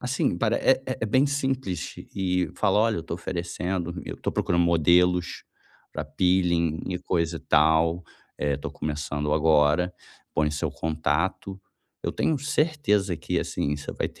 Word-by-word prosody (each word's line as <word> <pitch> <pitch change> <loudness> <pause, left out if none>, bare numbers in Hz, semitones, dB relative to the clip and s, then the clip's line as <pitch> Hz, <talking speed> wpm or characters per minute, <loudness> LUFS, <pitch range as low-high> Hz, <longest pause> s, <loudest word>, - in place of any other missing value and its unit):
Assim, 125 -8 0
pare 115 +2 +2
é 135 0 +3 0.2
é - - 0
bem 130 +6 +3
simples. 135 - -2 0.2
E 90 -3 0
fala: - - +2
"Olha, 110 -4 +2
estou 80 +1 -5
oferecendo, 85 +1 -3
eu - - -5
estou - - -3
procurando 85 0 +1
modelos 85 +2 +3 0.5
pra - - -4
peeling 85 -3 +1
e 90 -1 -2
coisa 85 -2 -1
e - - -15
tal. 80 +3 +3 0.4
Eh, 70 -1 0
estou 70 - -5
começando 75 -1 -3
agora", 80 +3 +3 0.4
põe 75 -1 +2
seu 75 -1 -2
contato. 80 +4 -2 0.4
Eu - - 0
tenho 155 - +1
certeza 140 - +1
que, 75 - -2
assim, 75 +1 -2
você 70 - -6
vai - - -2
ter - - -20
85 Hz, 150 wpm, -26 LUFS, 80-95 Hz, 0.5 s, é